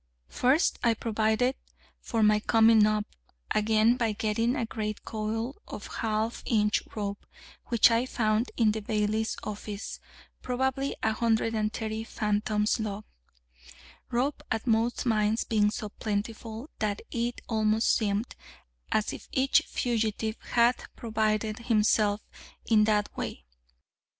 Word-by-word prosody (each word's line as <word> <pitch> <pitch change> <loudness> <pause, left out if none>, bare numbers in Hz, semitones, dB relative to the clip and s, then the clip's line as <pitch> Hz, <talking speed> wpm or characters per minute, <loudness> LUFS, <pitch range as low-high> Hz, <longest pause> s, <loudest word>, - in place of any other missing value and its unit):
First 265 +7 +2
I 230 -2 +3
provided 220 +3 +1 0.5
for 225 -2 -1
my 210 0 +5
coming 225 0 +5
up 215 -1 0 0.5
again 220 +2 +3
by 230 -4 0
getting 225 +4 0
a 250 -5 -1
great 215 -1 -4
coil 225 - -3
of - - -7
half 220 0 -1
inch 210 -2 +2
rope, 200 -2 -4 0.4
which 235 0 +5
I 230 +3 +2
found 220 -1 +1
in 225 -3 +4
the 220 +1 -3
bailiff's 215 +1 -1
office, 210 0 -6 0.4
probably 265 +2 -1
130 220 0 0
fathoms 210 0 0
long, 210 -1 -3 1.1
rope 260 +5 0
at 220 0 -2
most 230 +1 +1
mines 215 -1 +2
being 210 -2 +2
so 210 0 -5
plentiful, 220 +5 -4
that 210 -1 -1
it 240 0 -2
almost 220 0 +2
seemed 210 +1 -1 0.6
as 215 - +1
if - - -9
each 265 +1 +3
fugitive 220 -2 -1 0.2
had 240 +1 +4
provided 215 -1 -1
himself 215 -2 +2 0.4
in 215 -2 +4
that 210 -1 +1
way. - - -5
220 Hz, 120 wpm, -28 LUFS, 215-230 Hz, 1.1 s, my